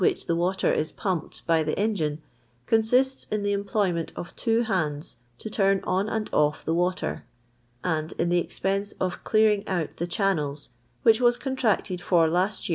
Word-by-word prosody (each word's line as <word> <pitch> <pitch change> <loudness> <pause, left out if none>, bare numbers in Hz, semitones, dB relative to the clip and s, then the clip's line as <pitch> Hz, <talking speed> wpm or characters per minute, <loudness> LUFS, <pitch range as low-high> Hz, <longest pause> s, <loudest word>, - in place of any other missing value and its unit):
i - - +4
the 170 - 0
water 180 +3 +1
is 155 - -1
pumped 185 -5 -3
by 165 -1 +3
the 155 0 -2
engine, 170 -9 0 0.5
consists 250 +4 +2
in 210 -1 -2
the 205 - +1
employment 200 -4 0
of 175 - -7
two 230 0 +1
hands 160 -9 -2 0.2
to - - -8
turn 195 -2 +2
on 190 +3 0
and 220 -1 -2
u? 150 0 +4
the 160 - 0
water, 180 +2 -1 0.6
and 160 -2 -1
in 170 - -1
the 175 0 +3
expense 195 +3 -2
of 185 -1 -3
clearing 215 -2 +3
out 175 -5 -2
tb* 170 +1 -3
channels, 155 -9 -1 0.3
which 225 +1 +5
was 240 0 +4
contracted 225 -9 -1
for 175 -2 +3
List 180 +6 0
ve. - - -3
190 Hz, 175 wpm, -26 LUFS, 170-215 Hz, 0.6 s, which